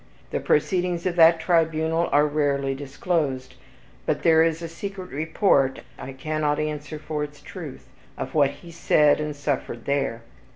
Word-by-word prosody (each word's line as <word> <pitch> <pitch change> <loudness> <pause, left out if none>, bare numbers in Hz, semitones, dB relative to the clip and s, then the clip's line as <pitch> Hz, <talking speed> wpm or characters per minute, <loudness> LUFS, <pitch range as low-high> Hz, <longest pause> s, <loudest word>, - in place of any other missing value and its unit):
The - - -1
proceedings 180 - 0
of 180 -2 0
that 165 0 +7
tribunal 165 -1 +1
are 145 +1 +5
rarely 140 -2 0
disclosed, 140 -1 -2 0.5
but - - 0
there 160 -1 +5
is 165 0 +1
a - - -3
secret 185 +2 -7
report 150 -2 +1 0.2
(I 135 - -7
cannot 150 +2 -1
answer 155 0 -4
for 150 0 -4
its 145 0 -8
truth) 150 -4 -9 0.3
of 130 - -5
what 145 -3 +4
he 170 +5 -12
said 150 -3 +3
and 150 -1 -3
suffered 140 -5 -3
there. 135 -5 -1
150 Hz, 155 wpm, -24 LUFS, 145-165 Hz, 0.5 s, that